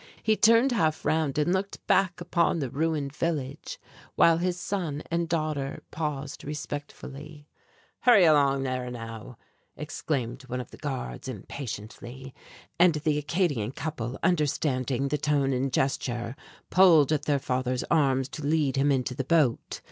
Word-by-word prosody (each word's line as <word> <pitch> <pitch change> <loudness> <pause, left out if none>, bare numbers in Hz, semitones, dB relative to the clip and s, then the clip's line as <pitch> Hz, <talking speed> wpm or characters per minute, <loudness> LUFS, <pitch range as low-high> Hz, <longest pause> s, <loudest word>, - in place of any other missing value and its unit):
He 220 - +3
turned 230 +6 +5
half 160 -10 0
round 155 -3 +1
and 155 +4 +2
looked 195 +1 -3
back 185 -2 +2
upon 170 -1 +1
the 135 -6 -3
ruined 150 -2 -1
village, 150 -5 -3 0.4
while 165 -1 +5
his 180 0 -1
son 170 -7 -3
and 170 0 0
daughter 155 -4 -2
paused 150 -3 -4
respectfully. 145 0 -7 0.5
"Hurry 235 -6 +6
along 140 -3 +4
there 130 -1 -2
now," 115 0 -8 0.4
exclaimed 135 -4 -3
one 125 0 -3
of 125 - -7
the - - -12
guards, - - -5
impatiently; 130 +1 -7 0.5
and 175 -2 +6
the 150 0 0
Acadian 145 - -1
couple, 135 -5 -4
understanding 140 -5 0
the 150 +1 -1
tone 140 -2 +1
and 130 +1 -1
gesture, 120 -2 -1 0.4
pulled 165 -6 +6
at 155 - 0
their 145 -1 +2
father's 130 -1 -1
arms 135 -5 +3
to 150 - -7
lead 145 -2 +1
him 140 +1 +3
into 130 -2 0
the 135 +1 -3
boat. 140 -4 +1
145 Hz, 145 wpm, -27 LUFS, 130-160 Hz, 0.5 s, Hurry